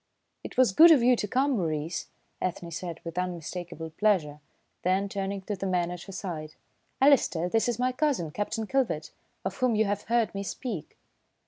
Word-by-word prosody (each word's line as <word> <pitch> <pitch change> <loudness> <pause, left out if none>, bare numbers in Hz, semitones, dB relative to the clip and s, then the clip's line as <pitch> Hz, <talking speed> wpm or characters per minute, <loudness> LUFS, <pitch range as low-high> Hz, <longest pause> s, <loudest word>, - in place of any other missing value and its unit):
"It - - -8
was 255 -5 +5
good 325 - +8
of 295 -7 +6
you 250 +1 +6
to 210 - -2
come, 265 +6 +2
Maurice," 165 - -2 0.3
Ethne 175 -2 -3
said 170 0 -5
with 170 +1 -4
unmistakable 175 -2 -5
pleasure, 160 -6 +1 0.4
then, 190 +2 +1
turning 195 0 -3
to 205 +1 -3
the 195 0 -3
man 175 -2 0
at 180 -1 -6
her 195 - -9
side, 165 -5 -6 0.4
"Alister, 245 - +4
this 225 +5 +1
is 235 - -1
my 250 +1 +1
cousin, 255 - 0
Captain 220 +5 -2
Kilvert, 225 - -1 0.3
of - - -3
whom 255 -4 +2
you 220 +1 +3
have 205 0 -2
heard 230 -5 +2
me 200 - -3
speak." 200 - -5
195 Hz, 185 wpm, -28 LUFS, 175-235 Hz, 0.4 s, good